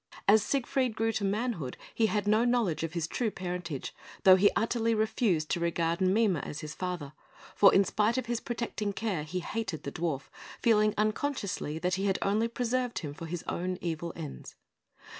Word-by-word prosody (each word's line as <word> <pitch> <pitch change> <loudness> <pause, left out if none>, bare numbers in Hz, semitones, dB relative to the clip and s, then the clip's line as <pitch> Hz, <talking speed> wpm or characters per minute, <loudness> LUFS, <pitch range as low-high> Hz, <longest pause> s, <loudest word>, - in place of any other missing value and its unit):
As 210 +2 +7
Siegfried 255 +1 0
grew 225 +1 +1
to 215 - -2
manhood, 200 - -1 0.2
he 225 - +3
had 210 -2 -1
no 215 +2 +4
knowledge 240 -9 +1
of 165 0 -3
his 170 -2 -1
true 225 +7 -1
parentage, 180 -7 -5 0.3
though 190 -2 +9
he 200 +2 +5
utterly 230 0 +1
refused 215 -7 +1
to - - +1
regard 170 0 0
Mime 190 0 +3
as 150 +1 -5
his 155 0 -6
father; 175 -6 -4 0.4
for 200 - +7
in 195 - +5
spite 215 +5 +1
of 255 - -1
his 240 -1 -1
protecting 230 -4 -3
care, 200 -7 -2
he 170 +5 -4
hated 190 -6 -4
the 140 - -4
dwarf, 160 -4 -2 0.4
feeling 215 -2 +3
unconsciously 215 - -1
that 180 +3 -1
he 200 - +1
had 195 - +2
only 210 +3 +2
preserved 245 +1 -1
him 145 -4 -4
for 165 +3 -8
his 175 +1 -4
own 180 +1 -2
evil 170 0 -3
ends. 155 -4 -8
200 Hz, 185 wpm, -30 LUFS, 170-225 Hz, 0.4 s, though